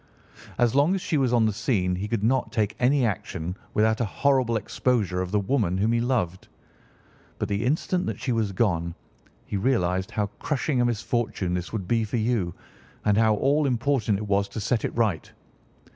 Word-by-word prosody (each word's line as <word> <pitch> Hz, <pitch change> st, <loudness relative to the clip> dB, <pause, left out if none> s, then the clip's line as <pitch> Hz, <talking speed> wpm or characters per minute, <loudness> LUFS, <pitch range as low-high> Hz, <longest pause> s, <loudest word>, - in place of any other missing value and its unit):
"As 120 Hz, -2 st, +3 dB
long 145 Hz, +7 st, +3 dB
as 190 Hz, -, -3 dB
she -, -, -1 dB
was 130 Hz, -3 st, +2 dB
on 120 Hz, -2 st, +4 dB
the 110 Hz, -, +1 dB
scene 100 Hz, -4 st, 0 dB
he 100 Hz, +3 st, -3 dB
could 110 Hz, -2 st, -2 dB
not 130 Hz, +4 st, +1 dB
take 110 Hz, -2 st, 0 dB
any 130 Hz, +1 st, +3 dB
action 90 Hz, -4 st, -3 dB, 0.2 s
without 110 Hz, +2 st, +2 dB
a -, -, +2 dB
horrible 130 Hz, 0 st, +1 dB
exposure 105 Hz, -4 st, 0 dB
of 90 Hz, -, -3 dB
the 105 Hz, +2 st, +1 dB
woman 100 Hz, -4 st, 0 dB
whom 105 Hz, +4 st, +2 dB
he 115 Hz, 0 st, +2 dB
loved. 110 Hz, -8 st, -1 dB, 0.9 s
But -, -, -2 dB
the 100 Hz, +2 st, -1 dB
instant 160 Hz, +7 st, 0 dB
that -, -, -3 dB
she 130 Hz, 0 st, -2 dB
was 110 Hz, -4 st, 0 dB
gone 85 Hz, -5 st, 0 dB, 0.5 s
he 100 Hz, -, -3 dB
realised 95 Hz, -5 st, +1 dB
how 105 Hz, -, -1 dB
crushing 145 Hz, -2 st, 0 dB
a -, -, +3 dB
misfortune 115 Hz, -5 st, -1 dB
this 90 Hz, 0 st, -3 dB
would 100 Hz, -5 st, -4 dB
be 115 Hz, +1 st, +2 dB
for 110 Hz, +3 st, -2 dB
you, 110 Hz, -6 st, 0 dB, 0.5 s
and 105 Hz, -1 st, +4 dB
how 110 Hz, 0 st, +4 dB
all 140 Hz, +6 st, +2 dB
important 120 Hz, -4 st, +1 dB
it 105 Hz, -, -4 dB
was 100 Hz, 0 st, +1 dB
to 100 Hz, -, -6 dB
set 110 Hz, +2 st, 0 dB
it -, -, -4 dB
right. 105 Hz, -8 st, 0 dB
110 Hz, 195 wpm, -25 LUFS, 100-125 Hz, 0.9 s, on